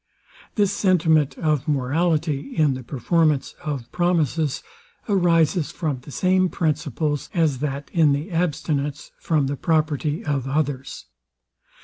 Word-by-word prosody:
This 205 -3 +2
sentiment 165 -7 +2
of 150 -3 0
morality, 155 - 0
in 150 -4 +3
the 130 - -5
performance 150 +3 0
of 140 -7 -4
promises, 165 -4 0 0.4
arises 175 -4 +2
from 150 -6 -3
the 125 - -14
same 185 +4 +2
principles 150 -2 -1
as 155 -6 +2
that 140 0 -4
in 160 -4 +4
the 145 +7 -2
abstinence 150 -4 -2
from 155 -4 +1
the 140 +1 -2
property 155 - 0
of 135 -3 -1
others. 140 -2 -2
155 Hz, 120 wpm, -23 LUFS, 140-170 Hz, 0.4 s, in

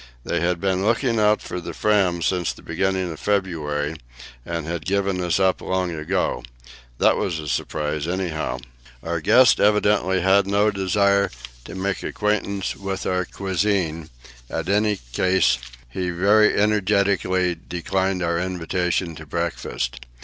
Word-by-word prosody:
They - - -1
had 85 0 0
been 95 0 0
looking 115 +1 +1
out 105 0 +3
for 90 - -5
the - - -7
Fram 95 -5 +2
since 90 -2 0
the - - -13
beginning 95 +1 -1
of 80 - -8
February, 80 -7 -1 0.5
and 85 0 -4
had 85 -1 -4
given 100 0 0
us 90 +1 +1
up 95 -1 +2
long 95 -1 -1
ago. 80 -4 -1 0.6
That - - +4
was 85 -4 -1
a 75 -1 -6
surprise, 75 +1 -2
anyhow. 85 -6 -2 0.5
Our 85 0 -2
guest 125 +7 +5
evidently 105 -2 +3
had 95 +2 +4
no 100 +2 +3
desire 100 +1 +2 0.4
to - - -8
make 95 +1 -2
the - - -5
acquaintance 105 -2 -1
of 95 -1 -5
our 90 0 0
cuisine; 95 -5 -1 0.4
at - - -3
any 105 +1 +2 0.2
rate, 90 -8 +3 0.3
he 90 +9 -3
very 100 +5 +4
energetically 100 -3 +2
declined 95 +1 -1
our 85 0 0
invitation 90 -1 -1
to 80 - -10
breakfast. - - -3
95 Hz, 145 wpm, -23 LUFS, 85-100 Hz, 0.6 s, guest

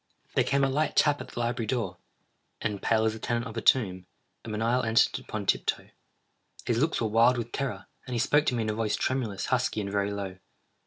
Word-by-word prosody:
There - - +3
came 140 +1 +1
a - - +4
light 150 +4 0
tap 145 -1 +3
at - - -8
the - - -7
library 120 -1 -1
door—and, 105 -1 -5
pale 110 -1 +2
as 110 - +1
the 110 - -8
tenant 120 +1 -1
of 115 -2 -7
a 115 - -2
tomb, 95 -9 +2 0.4
a - - -8
menial 115 +4 +1
entered 115 -1 +3
upon - - -5
tiptoe. - - 0 0.8
His 120 -2 +1
looks 155 +4 +1
were 115 - +1
wild 115 +3 +4
with 120 0 -4
terror, 120 -9 -3 0.2
and 125 - -3
he - - 0
spoke 145 +5 +3
to 125 - +2
me 115 - 0
in 110 - -2
a - - -2
voice 110 -1 0
tremulous, 120 -7 -1
husky, - - +1
and 100 -1 -3
very 100 0 0
low. 100 -2 -5
115 Hz, 220 wpm, -28 LUFS, 105-125 Hz, 0.8 s, a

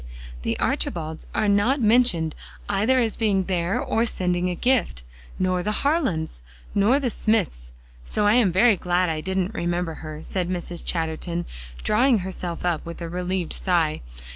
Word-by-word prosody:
"The - - -1
Archibalds 160 -2 -2
are 215 - +2
not 205 +8 +3
mentioned, 215 -9 +3 0.3
either 210 +6 +2
as 230 -4 +2
being 200 -4 +1
there 180 0 0
or 225 - +1
sending 180 -3 0
a 180 - -2
gift, 235 - +1 0.3
nor 185 -1 +1
the 210 +3 -2
Harlands, 195 - 0 0.3
nor 220 +8 +4
the 255 -4 -1
Smythes, 175 - +1 0.3
so 205 - +1
I 205 - +5
am 230 -6 +4
very 210 +5 +5
glad 180 0 +1
I 155 -1 -3
didn't 190 +3 -1
remember 175 -3 -1
her," 155 0 -7
said 180 -2 -2
Mrs. 175 -1 -4
Chatterton, 170 +1 -2 0.4
drawing 240 +3 +4
herself 180 -2 -4
up 170 -3 0
with 170 0 -8
a 170 -1 -5
relieved 180 0 -2
sigh. 170 -5 0
180 Hz, 160 wpm, -24 LUFS, 170-215 Hz, 0.4 s, I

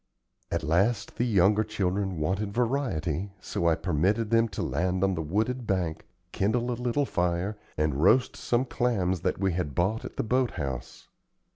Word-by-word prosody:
At - - -1
last 100 +8 +1
the 120 - +1
younger 105 -1 +4
children 95 -3 -1
wanted 95 +7 -1
variety, 100 - -1
so 85 - -2
I 80 - +4
permitted 95 +8 0
them 115 0 +4
to 100 - -4
land 90 +2 0
on 95 -1 +3
the 80 - -2
wooded 110 +9 -1
bank, 90 -5 -1 0.2
kindle 120 +5 0
a - - +1
little 125 +4 0
fire, 90 0 -1 0.2
and 75 -1 +1
roast 125 +8 +4
some 120 +2 0
clams 100 - 0
that - - 0
we 95 -1 0
had 80 -6 -2
bought 100 +6 +1
at - - -8
the - - 0
boat 125 +1 +1
house. 65 -6 -5
95 Hz, 170 wpm, -28 LUFS, 85-115 Hz, 0.2 s, younger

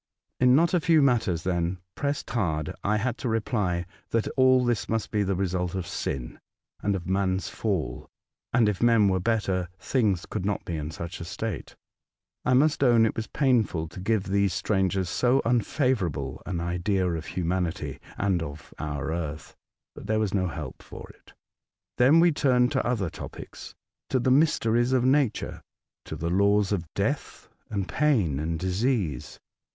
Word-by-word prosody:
In 125 0 +5
not 165 +4 +3
a 180 - +4
few 165 -1 +4
matters, 115 - +2
when 90 0 0 0.2
pressed 145 0 -3
hard, 85 -10 -1
I 105 +1 +2
had 120 +2 -2
to 125 - -2
reply, 105 -6 0 0.2
that 115 -1 0
all 130 -1 +4
this 120 -3 0
must 115 -1 -1
be 105 - +1
the 100 -1 0
result 90 -1 -1
of 95 -2 -3
sin, 65 -7 -4 0.4
and 100 -1 +1
of 90 -2 -5
man's 95 0 0
Fall, 100 -8 -3 0.4
and 120 -3 +4
if 105 -3 -1
men 115 -4 +5
were 95 -1 +1
better 95 -4 0
things 100 -4 0
could - - -4
not 100 0 -2
be 85 - -3
in 75 -1 -4
such 85 +2 -7
a - - -4
state. 95 +2 -5 0.7
I 125 - +3
must 145 +2 +3
own 120 -3 +5
it 110 - -1
was 110 - -3
painful 115 - +1
to 90 - -10
give 105 +1 +1
these 100 -2 +1
strangers 95 -1 0
so 125 +7 +2
unfavour 125 - +1
able 70 -3 -5
an 90 -3 -2
idea 90 +3 0
of 85 -2 -3
humanity 85 -4 -2 0.2
and 95 -4 +1
of 75 -1 -8
our 75 +1 -3
earth, 80 -2 -5 0.4
but - - -10
there 110 - +1
was 110 -3 0
no 95 -2 +1
help 85 - -7
for - - -11
it. - - -22 0.7
Then 135 +7 +6
we 170 0 +5
turned 125 -4 +3
to 135 - +1
other 105 -9 -1
topics - - -9 0.2
— - - -65
to 130 - +2
the 130 +1 +1
mys 155 +4 +4
teries 120 +3 +1
of 125 -1 +3
Nature, 135 -3 +1 0.4
to - - -6
the 85 +1 -3
laws 100 +1 +3
of 85 -6 -2
death, - - -2 0.2
and 100 -3 -2
pain, 110 - +1
and 80 +2 -2
disease. 95 - -1
100 Hz, 180 wpm, -26 LUFS, 90-120 Hz, 0.7 s, Then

